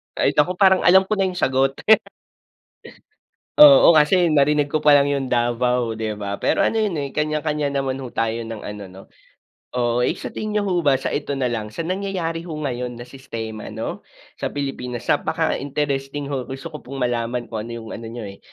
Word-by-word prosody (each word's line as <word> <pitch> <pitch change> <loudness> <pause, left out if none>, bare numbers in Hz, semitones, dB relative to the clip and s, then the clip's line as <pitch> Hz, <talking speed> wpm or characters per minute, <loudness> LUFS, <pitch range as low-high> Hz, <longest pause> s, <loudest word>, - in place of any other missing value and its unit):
Ay - - +2
naku, 175 +5 +2
parang 190 0 +5
alam 190 +2 +6
ko 195 - -2
na 190 - +3
yung 185 - -5
sagot. 135 -3 +1 1.8
Oo, 280 - +9
kasi 170 +4 +4
narinig 145 +1 +3
ko 155 +1 -2
pa 150 - +6
lang 140 -1 +5
yung 140 -2 -1
Davao, 120 -1 +1
'di 110 -1 -4
ba? 100 -1 -3
Pero - - +2
ano - - +2
yon, 215 -2 +1
eh 140 -1 -5
kanya-kanya 150 -1 -1
naman 135 -1 -2
ho 125 - -8
tayo 115 0 -1
ng 115 -1 -7
ano, 105 0 -7
'no. 95 +1 -12 0.7
Oo, 120 -1 +1
eh, 125 - +1
sa - - -7
tingin 215 -1 -4
niyo 210 - +2
ho 185 -3 0
ba 145 -5 +3
so 130 - -3
ito 145 -1 -2
na 125 -2 -1
lang, 110 -2 -3
sa 105 +10 -6
nangyayari 180 -2 -3
ho 160 - -5
ngayon 125 -5 -4
na 120 - -8
sistema 115 -4 -7
'no, 110 +1 -5 0.4
sa - - -1
Pilipinas 125 -4 -5
napaka - - 0
interesting 140 0 -3
ho, 130 -3 -3
gusto 135 +5 -7
ko 150 - -8
pong 135 - -10
malaman 120 0 -1
kung 110 0 -4
ano - - -8
yung 110 - -10
ano 115 - -7
niyo 115 0 -7
eh, 100 -1 -9
135 Hz, 200 wpm, -21 LUFS, 120-155 Hz, 1.8 s, Oo